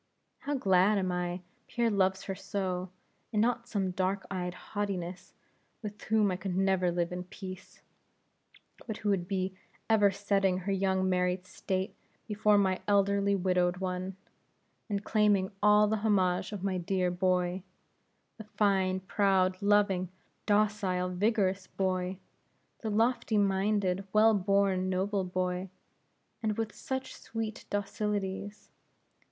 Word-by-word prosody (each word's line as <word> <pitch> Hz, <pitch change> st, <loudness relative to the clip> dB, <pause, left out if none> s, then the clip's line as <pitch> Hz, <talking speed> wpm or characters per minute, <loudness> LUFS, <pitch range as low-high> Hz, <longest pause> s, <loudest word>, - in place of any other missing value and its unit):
How 290 Hz, -, -2 dB
glad 195 Hz, -3 st, +4 dB
am 185 Hz, -2 st, 0 dB
I 180 Hz, 0 st, -2 dB
that 180 Hz, -, -38 dB
Pierre 235 Hz, -1 st, 0 dB
loves 190 Hz, -1 st, +1 dB
her 195 Hz, -, -3 dB
so, 185 Hz, -1 st, -3 dB, 0.4 s
and 215 Hz, -, 0 dB
not 235 Hz, +1 st, +1 dB
some 195 Hz, -5 st, -1 dB
dark 190 Hz, +1 st, -1 dB
eyed 180 Hz, -2 st, -3 dB
haughtiness, 185 Hz, -2 st, -5 dB, 0.5 s
with 210 Hz, -1 st, -7 dB
whom 215 Hz, -3 st, +3 dB
I 180 Hz, -, -2 dB
could 190 Hz, -1 st, -4 dB
never 190 Hz, -2 st, +2 dB
live 170 Hz, 0 st, -1 dB
in 180 Hz, 0 st, -5 dB
peace; 185 Hz, 0 st, -10 dB, 1.0 s
but 220 Hz, -2 st, -4 dB
who 210 Hz, -, -2 dB
would 185 Hz, -3 st, 0 dB
be 190 Hz, -1 st, -1 dB, 0.3 s
ever 215 Hz, -2 st, +5 dB
setting 195 Hz, -1 st, +1 dB
her 190 Hz, +2 st, -3 dB
young 190 Hz, -1 st, +1 dB
married 180 Hz, 0 st, 0 dB
state 190 Hz, +1 st, -3 dB, 0.3 s
before 210 Hz, -1 st, +3 dB
my 190 Hz, -2 st, +2 dB
elderly 200 Hz, 0 st, +3 dB
widowed 180 Hz, -1 st, +1 dB
one, 185 Hz, 0 st, -3 dB, 0.7 s
and 200 Hz, -1 st, -1 dB
claiming 205 Hz, -3 st, +2 dB
all 210 Hz, 0 st, +6 dB
the 220 Hz, +1 st, +1 dB
homage 195 Hz, -4 st, +1 dB
of 200 Hz, -3 st, -6 dB
my 190 Hz, -2 st, 0 dB
dear 180 Hz, 0 st, 0 dB
boy 180 Hz, 0 st, +1 dB, 0.8 s
the -, -, -6 dB
fine, 190 Hz, -3 st, +1 dB
proud, 190 Hz, -1 st, +2 dB
loving, 200 Hz, -3 st, +3 dB, 0.4 s
docile, 205 Hz, -3 st, +1 dB
vigorous 195 Hz, 0 st, +1 dB
boy! 185 Hz, -1 st, -1 dB, 0.6 s
the 220 Hz, -, -3 dB
lofty 225 Hz, +1 st, +1 dB
minded, 195 Hz, -1 st, +1 dB
well 220 Hz, +1 st, +6 dB
born, 195 Hz, -1 st, +2 dB
noble 190 Hz, +2 st, 0 dB
boy; 185 Hz, 0 st, -2 dB, 0.7 s
and 215 Hz, -2 st, -1 dB
with 225 Hz, -2 st, -2 dB
such 265 Hz, 0 st, -4 dB
sweet 225 Hz, -1 st, -5 dB
docilities! 205 Hz, 0 st, -3 dB
195 Hz, 135 wpm, -30 LUFS, 185-205 Hz, 1.0 s, all